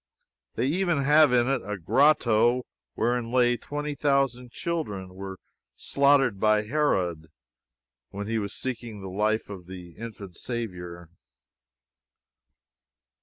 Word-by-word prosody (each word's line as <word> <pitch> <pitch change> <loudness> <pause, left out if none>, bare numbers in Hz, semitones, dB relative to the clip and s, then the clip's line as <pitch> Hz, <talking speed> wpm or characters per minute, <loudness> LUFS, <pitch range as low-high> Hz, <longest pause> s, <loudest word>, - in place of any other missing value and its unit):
They 120 - 0
even 170 0 +1
have 150 0 +6
in 120 -1 +3
it 135 -1 +1
a 105 +1 -4
grotto 120 - +3 0.3
wherein 120 0 0 0.3
twenty 150 +3 -4
thousand 135 -3 0
children 105 - -4
were 95 0 -7 0.4
slaughtered 140 -6 +3
by 110 0 +3
Herod 95 - 0 0.8
when 100 +1 -6
he 115 +1 -1
was 100 -1 -4
seeking 115 -5 -5
the 95 - -6
life 105 +3 0
of 95 -4 -9
the 90 -2 -9
infant 100 -3 -9
Saviour. 90 -8 -5
115 Hz, 115 wpm, -26 LUFS, 95-135 Hz, 0.8 s, have